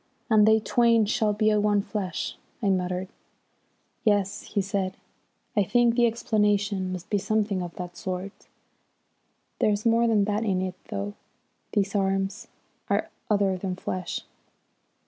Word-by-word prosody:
"'And 215 -1 +6
they 220 0 +6
twain 230 0 +3
shall 215 0 +1
be 215 +1 +2
one 205 -1 +2
flesh,'" 200 -4 -3 0.2
I 210 -4 +1
muttered. 185 0 0 1.0
"Yes," 205 -3 +1
he 210 - -2
said, 195 -1 -1 0.6
"I 205 - +4
think 240 +4 +3
the 240 0 +4
explanation 205 -4 +1
must 185 +1 -6
be 205 - +2
something 205 -2 0
of 175 -1 -6
that 180 -1 -6
sort. 185 +2 -6 1.1
There's 210 +1 +1
more 230 +1 +4
than 215 -3 +3
that 210 +2 0
in 190 -4 0
it, 185 -1 -3 0.2
though; 100 +1 -3 0.6
these 200 0 +1
arms 195 +3 0 0.4
are - - 0 0.2
other 200 -3 +2
than 185 0 -3
flesh." 185 0 -4
205 Hz, 140 wpm, -26 LUFS, 185-215 Hz, 1.1 s, And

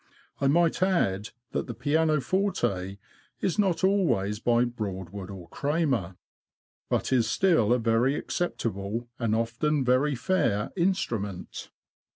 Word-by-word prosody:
I 140 - +2
might 170 +4 +3
add, 110 - +1 0.2
that - - -2
the 120 - -5
pianoforte 145 - 0 0.4
is 190 +3 -1
not 190 -3 +1
always 165 - +2
by 120 +1 +3
Broadwood 100 -5 -5
or 95 -4 -9
Cramer, 140 - -1 0.7
but - - 0
is 120 -3 +3
still 165 - +3
a 125 - +5
very 115 +4 +2
acceptable, 115 - -3
and 115 -3 +1
often 125 +6 0
very 130 +3 +3
fair, 115 - 0
instru 175 - 0
ment. 100 -3 -7
120 Hz, 125 wpm, -27 LUFS, 105-160 Hz, 0.7 s, a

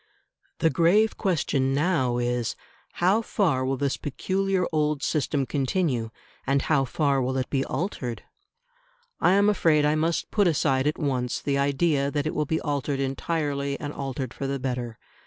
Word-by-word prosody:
The 160 - +2
grave 200 +6 +3
question 140 -8 0
now 145 -6 +1
is, 120 -1 -1 0.4
How 190 +6 +2
far 165 - 0
will 135 +1 -1
this 140 0 -1
peculiar 190 +6 -1
old 150 -2 0
system 145 -2 0
continue 135 -3 -1 0.4
and 135 +1 +2
how 140 -4 +2
far 140 0 +1
will 130 +1 -1
it 130 - -3
be 135 -1 +1
altered? 130 - -4 1.0
I 180 - +4
am 200 +1 +4
afraid 160 -7 +3
I 150 - +3
must 160 +2 -1
put 205 -3 +3
aside 140 -4 +2
at 150 - 0
once 130 -5 -1
the 140 -1 -1
idea 140 0 +1
that 145 0 -2
it 155 - -1
will 150 - 0
be 160 +2 0
altered 145 -1 -2
entirely 140 0 -2
and 145 0 -5
altered 135 -2 -4
for 135 - -4
the 140 0 -1
better. 125 -3 -4
140 Hz, 165 wpm, -26 LUFS, 135-165 Hz, 1.0 s, I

